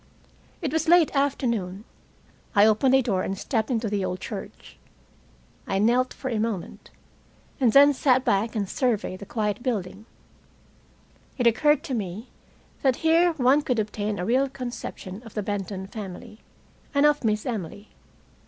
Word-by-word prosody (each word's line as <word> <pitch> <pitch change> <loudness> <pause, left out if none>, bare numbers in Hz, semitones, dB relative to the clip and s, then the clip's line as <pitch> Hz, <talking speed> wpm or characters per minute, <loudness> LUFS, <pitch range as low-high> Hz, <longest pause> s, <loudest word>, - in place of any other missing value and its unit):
It 300 -2 -2
was 320 +1 0
late 340 -3 +5
afternoon. 235 -9 -1 0.7
I 205 +1 +7
opened 220 +5 +4
a 265 - +4
door 195 -6 0
and 195 +1 -3
stepped 220 +1 -1
into 230 -3 0
the 205 -2 -1
old 185 0 -3
church. - - -9 0.9
I 195 - 0
knelt 240 +5 +2
for 265 - -7
a 225 - -1
moment, 215 -5 -4 0.7
and 250 -4 +4
then 285 +4 +7
sat 260 -1 +2
back 210 +4 +1
and 205 -3 -1
surveyed 220 -6 -1
the 200 - -10
quiet 210 0 -2
building. 215 -3 -3 1.3
It 245 - 0
occurred 295 +6 +3
to 265 - -5
me 210 +1 -5 0.5
that 265 -3 +3
here 335 +2 +4
one 275 0 +3
could 250 -4 -1
obtain 210 -1 -2
a 180 - -3
real 260 +5 +2
conception 240 -6 -7
of 225 -3 -14
the 210 - -2
Benton 195 -1 -4
family, 210 +2 -9 0.6
and 280 +1 +4
of 295 -1 +3
Miss 215 -1 0
Emily. 205 - -5
225 Hz, 155 wpm, -25 LUFS, 205-265 Hz, 1.3 s, I